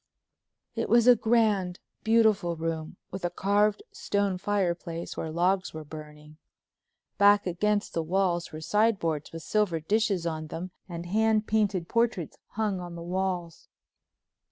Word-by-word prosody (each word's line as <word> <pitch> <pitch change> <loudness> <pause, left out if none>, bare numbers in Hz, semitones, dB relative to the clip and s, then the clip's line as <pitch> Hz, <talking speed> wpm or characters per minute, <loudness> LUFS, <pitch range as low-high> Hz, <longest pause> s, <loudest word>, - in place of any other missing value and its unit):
It - - -2
was 235 -1 +5
a 250 -1 +8
grand, 215 -6 +2 0.3
beautiful 220 -6 +3
room 160 +1 -4
with 190 0 -6
a 175 - +1
carved 205 - +1
stone 200 -2 -1
fireplace 175 -4 -2
where 160 - -4
logs 180 +2 0
were 155 - -6
burning. 150 0 -11 0.8
Back 205 0 +6
against 205 +4 0
the 165 - 0
walls 175 0 0
were 155 - -7
sideboards 170 -4 +1
with 165 0 -8
silver 205 -6 +1
dishes 200 +1 0
on 160 -2 -3
them 175 +4 -6 0.2
and 170 0 -6
hand 215 +3 +2
painted 205 -6 +1
portraits 230 -8 0
hung 210 -3 -1
on 175 -1 -7
the 170 - -7
walls. 180 -2 -3
185 Hz, 140 wpm, -28 LUFS, 165-210 Hz, 0.8 s, a